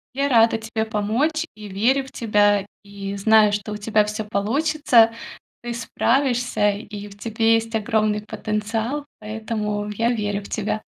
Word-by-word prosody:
Я 280 +1 +1
рада 225 -2 +4
тебе 220 0 -3
помочь 235 +10 0
и 210 -1 -9
верю 245 +8 +1
в 265 - -13
тебя! 205 -3 +2 0.2
И 200 -1 -6
знаю, 215 +1 +5
что 205 0 -3
у 210 - -4
тебя 210 0 +2
всё 210 +1 -4
получится. 230 +3 +3 0.5
Ты 240 0 -4
справишься, 245 -1 +1
и 205 0 -7
в 200 0 -14
тебе 225 +1 +2
есть 225 0 -2
огромный 215 -1 +1
потенциал, 220 +6 -3
поэтому 210 -1 -3
я 230 +3 0
верю 205 -3 -2
в - - -11
тебя. 215 0 -2
220 Hz, 155 wpm, -22 LUFS, 210-230 Hz, 0.5 s, знаю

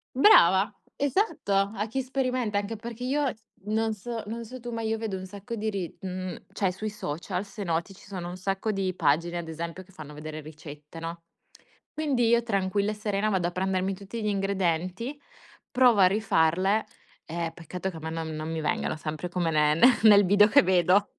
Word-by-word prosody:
Brava, 195 - +6 0.3
esatto, 285 - 0 0.2
a 210 +1 -2
chi 265 +5 -2
sperimenta, 255 -5 -1
anche 205 +2 -2
perché 235 +2 -7
io 280 +1 +1
s 220 - -27 0.2
non 220 +2 0
so 225 +2 -5
non 230 +3 -5
so 255 +3 -9
tu, 240 0 -6
ma 230 - -3
io 225 0 -1
vedo 220 -3 -3
un 185 0 -6
sacco 200 +5 -7
di 220 0 -2
ri 195 -5 -4
mhmm, 185 -1 -4 0.2
cioè 195 - 0
sui 215 +4 -4
social 180 -1 -4
se 205 +1 -7
noti, 170 +1 -1
ci 190 - -17
sono 185 -3 -5
un 175 - -6
sacco 195 +3 -2
di 190 -2 -1
pagine 170 +1 +1
ad 170 -1 -5
esempio 165 +3 -5
che 190 +1 -22
fanno 150 -3 -10
vedere 155 +1 -7
ricette, 150 0 -11
no, 165 +1 -6 0.7
quindi 275 -6 +1
io 235 0 +4
tranquilla 200 -1 0
e - - -5
serena 210 0 -1
vado 185 -4 +1
a - - -3
prendermi 190 +1 -1
tutti 200 +4 -7
gli - - -2
ingredienti, 195 - -1 0.5
provo 250 -3 +5
a 185 - +8
rifarle 195 0 +2 0.4
e 165 0 -3
peccato 175 +3 -5
che 175 - -11
a - - -6
me 160 +1 -4
non 165 0 -4
non 155 0 -5
mi 160 - -2
vengano 150 - -1
sempre 155 +2 -4
come 175 -2 0
ne 150 -1 +3
ne 245 +10 +6
nel 205 -2 +8
video 205 +2 +6
che 210 - +6
vedo. 185 +2 +4
195 Hz, 200 wpm, -27 LUFS, 170-220 Hz, 0.7 s, a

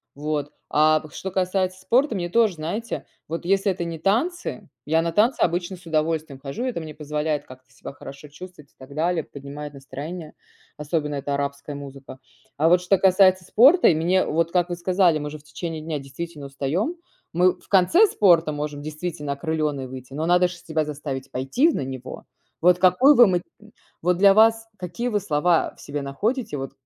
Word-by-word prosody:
Вот, 145 0 -3 0.2
а 155 +1 +4
п 155 - -12
что 190 - -5
касается 185 0 -1
спорта, 245 +6 +2
мне 175 -3 -2
тоже 215 -2 +3
знаете, 200 +9 -4 0.2
вот 165 +2 -5
если 195 +1 +2
это 175 -1 -4
не 165 -2 -5
танцы, 225 - -1 0.2
я 160 +1 +3
на 170 - -1
танцы 225 +8 +2
обычно 175 +2 -1
с 175 - -19
удовольствием 155 -3 -1
хожу, 140 - -5
это 250 -9 -2
мне 155 -2 -9
позволяет 150 0 -2
как-то 130 0 -15
себя - - -10
хорошо 140 +2 -11
чувствовать 150 -1 -13
и - - -40
так 135 +2 -12
далее, 165 0 0
поднимает 145 +1 -9
настроение, 150 +5 -8 0.4
особенно 150 0 -2
это 140 0 -2
арабская 140 +1 -4
музыка. 135 -1 -10 0.4
А 155 +3 +3
вот 180 0 +5
что 190 +2 +2
касается 185 -1 +4
спорта, 280 - +6
и 160 - +3
мне 180 +4 +2
вот 165 +2 0
как 175 0 +1
вы 175 - -2
сказали, 175 -2 +2
мы 150 - -4
же 155 - -7
в 145 - -23
течение 160 +1 -6
дня 155 -2 -3
действительно 145 +2 -8
устаем, 150 - -2 0.4
мы 180 +2 +4
в - - -23
конце 260 - +5
спорта 170 - +3
можем 145 0 -4
действительно 155 -2 -4
окрыленной 150 -3 -2
выйти. 130 0 -10
Но 155 +3 -2
надо 180 +1 +4
ж - - -8
себя 160 -2 -2
заставить 140 -3 -6
пойти 135 - +1
в - - -1
на - - -2
него. 130 -1 -8 0.4
Вот 180 +1 +5
какой 255 +11 +6
вы 240 - +8
м 180 -4 +1 0.6
вот 180 0 +2
для 195 0 +6
вас 225 +1 +4
какие 185 +7 -3
вы 210 -2 +1
слова 160 +2 +1
в - - -15
себе 145 0 -5
находите 210 - -2
вот, 135 0 -5
165 Hz, 190 wpm, -23 LUFS, 145-185 Hz, 0.6 s, вы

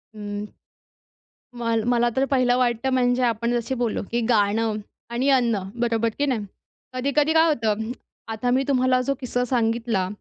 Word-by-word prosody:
हं, 205 0 -5 1.1
म 240 - -5 0.3
मला 240 -1 +3
तर 265 +1 +2
पहिलं 255 -3 +2
वाटतं 245 0 +1
म्हणजे 250 0 +2
आपण 235 0 0
जशी 235 +3 -4
बोललो, 230 -3 0
की 240 +1 0
गाणं 220 0 +2 0.4
आणि 245 +4 0
अन्न 240 -5 +3 0.2
बरोबर, 230 -1 +1
की 290 - +2
नाही. 245 -7 -1 0.5
कधी-कधी 280 +4 +1
काय 325 0 +5
होतं 230 -9 +1
हं. 220 +2 -4 0.4
आता 225 +3 -2
मी 265 +1 +2
तुम्हाला 255 -2 +3
जो 275 - +1
किस्सा 250 -1 -1
सांगितला, 230 -5 0
240 Hz, 160 wpm, -23 LUFS, 225-255 Hz, 1.1 s, काय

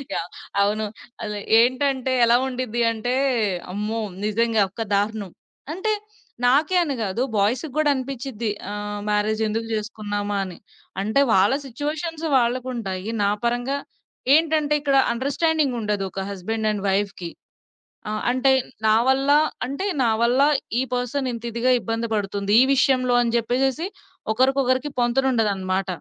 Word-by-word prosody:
Yeah! 170 - -2 0.3
అవును. 210 +2 +1 0.4
అలె 210 -2 -4 0.2
ఏంటంటే 260 +2 +1
ఎలా 235 0 +5
ఉండిద్ది 250 -2 -3
అంటే, 230 +2 -2 0.6
అమ్మో! 210 +3 -2 0.2
నిజంగా 225 +1 +2
ఒక 225 +4 -4
దారుణం. 205 -1 -1 0.4
అంటే 380 +6 -1 0.5
నాకే 290 +8 +3
అని 290 -5 -2
గాదు, 215 +3 -1
బాయ్స్‌కి 240 +9 +1
గూడా 310 -1 +3
అనిపించింది. 255 -3 -4 0.2
ఆహ్, 205 0 -4
మ్యారేజెందుకు 215 +1 0
చేసుకున్నామా 205 -1 -3
అని. 185 -2 -9 0.4
అంటే, 215 +7 +1
వాళ్ళ 195 +5 +4
సిట్యుయేషన్స్ 305 +5 -4
వాళ్ళకుంటాయి. 235 -6 -2
నా 200 - +3 0.2
పరంగా 245 +3 0 0.6
ఏంటంటే, 310 -2 +2
ఇక్కడ 280 -1 +2 0.2
అండర్‌స్టాండింగుండదు. 260 -6 0
ఒక 195 - -4
హస్బెండ్ 215 +3 -2
అండ్ 205 -2 -4
వైఫ్‌కి. 195 -3 -1 0.8
ఆహ్, 215 - -2
అంటే 255 +2 +3 0.4
నా 215 - +5
వల్ల 270 +1 +2 0.4
అంటే 280 +9 -4 0.2
నావల్ల 235 +3 +2 0.4
ఈ - - +2
పర్సన్ 250 +2 -2
ఇంత 230 -1 -7
ఇదిగా 240 +3 +2
ఇబ్బంది 225 0 -2
పడుతుంది, 200 0 -1
ఈ - - +3
విషయంలో 255 -2 +3
అని 235 0 0
చెప్పేసేసి, 265 +7 0 0.5
ఒకరికొకరికి 260 +2 +2
పొంతనుండదనమాట. 220 -7 +1
235 Hz, 120 wpm, -23 LUFS, 210-265 Hz, 0.8 s, ఎలా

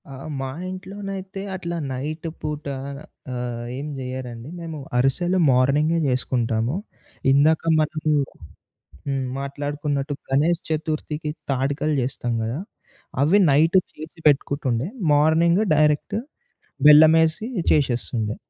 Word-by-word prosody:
ఆ! - - -8 0.3
మా 135 - -3 0.2
ఇంట్లోనైతే 195 +1 -6
అట్లా 170 -2 -4 0.2
నైట్ 155 +5 -4
పూట 150 0 -4 0.7
ఆహ్, 120 -1 -4
ఏం 140 +2 -5
జెయ్యరండి. 125 -1 -6
మేము 165 -2 -6 0.2
అరిసెలు 175 +9 +2
మార్నింగే 140 +6 +3
జేసుకుంటాము. 120 -1 0 0.6
ఇందాక 150 +3 +4 0.2
మనము 155 0 0 0.9
హ్మ్. 135 -1 -1
మాట్లాడుకున్నట్టు 145 +1 -3 0.2
గణేష్ 155 +6 +2
చతుర్థికి 155 -1 -2 0.2
తాడికలు 140 +3 0
చేస్తాం 120 -1 -2
గదా! 115 +6 -3 0.6
అవి 160 +8 +5
నైట్ 160 +6 +4 0.2
చేసి 155 +3 -10
పెట్టుకుంటుండే 140 -2 +1 0.3
మార్నింగ్ 160 +5 +4
డైరెక్ట్ 150 +5 +2 0.7
బెల్లమేసి 160 +6 +6 0.2
చేసేస్తుండే. 120 -6 0
150 Hz, 95 wpm, -23 LUFS, 130-160 Hz, 0.9 s, బెల్లమేసి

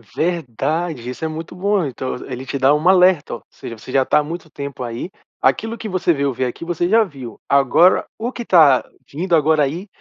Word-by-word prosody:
Verdade. 155 -3 -2
Isso 125 +5 -7
é - - +1
muito 160 +2 -7
bom. 195 -2 0
Então, 130 -1 -4
ele 125 - -9
ele 130 - -8
te 140 - -4
dá 135 +2 +4
um 155 +4 0
alerta. 180 -7 +4
Ou - - -12
seja, 115 - -9
"você 125 - -11
já 135 - +4
tá - - +3
há 150 - 0
muito 165 +1 -7
tempo 140 -3 -7
aí. 120 +7 -5 0.3
Aquilo 225 +1 +1
que 220 - -6
você 185 -2 0
veio 140 -2 -1
ver 130 - -2
aqui, 125 - -7
você 175 0 -1
já 225 +2 +5
viu. 130 - -10
Agora, 140 +6 +4
o 235 +2 -3
que 240 - -6
tá 155 - +5 0.3
vindo 170 +4 0
agora 155 0 +3
aí" 165 +9 -3
155 Hz, 220 wpm, -19 LUFS, 135-180 Hz, 0.3 s, já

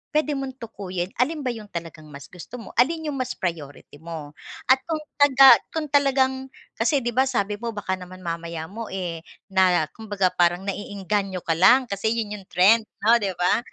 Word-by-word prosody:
puwede 305 0 +2
mong 270 -2 -4
tukuyin 185 -4 -5
alin 295 +4 0
ba 255 - -1
yung 220 -3 -9
talagang 165 -4 -8
mas 140 -1 -12
gusto 180 +6 -10
mo, 230 - -9
alin 315 +4 +2
yung 275 - -5
mas 255 -1 -3
priority 150 -4 -6
mo, 160 -3 -8 0.4
at 265 - +6
kung 315 -2 -2 0.2
taga 270 -2 +8 0.2
kung 315 -1 -2
talagang 265 -2 +2 0.3
kasi 265 +3 +1
'di 240 - -1
ba, 260 +3 +2
sabi 210 -5 -1
mo 230 -1 -5
baka 190 -2 -3
naman 185 0 -11
mamaya 170 -1 -4
mo, 225 +1 -6
eh, 175 -3 -4 0.3
na 185 -3 +4
kumbaga 205 -4 -1
parang 175 0 +1
naeengganyo 200 -1 -3
ka 165 - -1
lang 240 +11 +5
kasi 220 +3 -1
'yon 215 -3 -3
yung 190 - -17
trend 215 +5 +4 0.2
'no, 230 +2 +5
di 195 -4 -2
ba? 180 +5 +2
205 Hz, 190 wpm, -24 LUFS, 180-255 Hz, 0.4 s, taga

